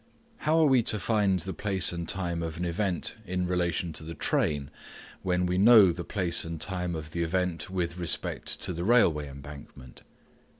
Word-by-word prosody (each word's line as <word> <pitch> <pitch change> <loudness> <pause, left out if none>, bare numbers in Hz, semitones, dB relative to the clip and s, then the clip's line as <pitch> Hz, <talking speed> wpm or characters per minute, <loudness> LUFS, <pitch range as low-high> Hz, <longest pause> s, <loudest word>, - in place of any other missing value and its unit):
How 155 +2 +1
are 160 - +5
we 130 -4 +4
to 110 -1 0
find 100 -3 +1
the 95 +3 -5
place 95 -3 +2
and 85 -1 -4
time 85 -3 -2
of 80 -1 -5
an 90 - -3
event 90 +2 -2
in 90 -2 -2
relation 90 -1 -1
to 80 - -4
the 80 +1 -7
train, 70 -2 0 0.5
when 90 -1 0
we 90 +1 0
know 105 -3 +7
the 85 +1 -6
place 90 -3 +1
and 80 -1 -6
time 90 -2 -2
of 80 0 -7
the 85 - -3
event 90 0 -2
with 90 -2 -3
respect 85 -2 -1
to 90 - -1
the 85 +1 -4
railway 85 -10 +3
embankment 70 -2 -12
90 Hz, 185 wpm, -28 LUFS, 85-95 Hz, 0.5 s, know